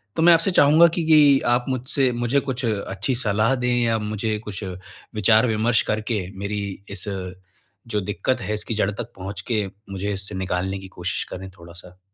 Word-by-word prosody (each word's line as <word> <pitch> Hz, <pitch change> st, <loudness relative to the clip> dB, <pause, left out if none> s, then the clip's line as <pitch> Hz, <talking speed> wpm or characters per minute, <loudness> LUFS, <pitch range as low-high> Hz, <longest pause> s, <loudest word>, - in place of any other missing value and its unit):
तो -, -, 0 dB
मैं 170 Hz, 0 st, +8 dB
आपसे 165 Hz, +4 st, +3 dB
चाहूँगा 160 Hz, +1 st, +6 dB
कि 170 Hz, -, 0 dB
कि 150 Hz, -3 st, +6 dB
आप 120 Hz, +1 st, +2 dB
मुझसे 130 Hz, 0 st, 0 dB
मुझे 120 Hz, +4 st, +1 dB
कुछ 130 Hz, -2 st, -3 dB
अच्छी 105 Hz, +3 st, -1 dB
सलाह 110 Hz, +1 st, +2 dB
दें 125 Hz, -1 st, 0 dB
या 115 Hz, -1 st, +2 dB
मुझे 105 Hz, +1 st, -2 dB
कुछ 105 Hz, 0 st, -6 dB, 0.5 s
विचार-विमर्श 110 Hz, +2 st, +3 dB
करके 110 Hz, -1 st, -1 dB, 0.2 s
मेरी 105 Hz, +1 st, -3 dB, 0.3 s
इस, 100 Hz, -, -4 dB, 0.8 s
जो 105 Hz, -3 st, -1 dB
दिक्कत 105 Hz, +6 st, -1 dB
है 105 Hz, +3 st, -3 dB
इसकी 105 Hz, +2 st, -4 dB
जड़ 100 Hz, -1 st, +1 dB
तक 120 Hz, +3 st, -7 dB
पहुँच 95 Hz, 0 st, -6 dB
के 105 Hz, -3 st, +1 dB, 0.3 s
मुझे 100 Hz, +2 st, -3 dB
इससे 100 Hz, 0 st, -4 dB
निकालने 95 Hz, +1 st, -2 dB
की 95 Hz, -, -10 dB
कोशिश 90 Hz, 0 st, -2 dB
करें 95 Hz, +1 st, -7 dB
थोड़ा-सा। 85 Hz, +2 st, -13 dB
110 Hz, 175 wpm, -23 LUFS, 100-125 Hz, 0.8 s, मैं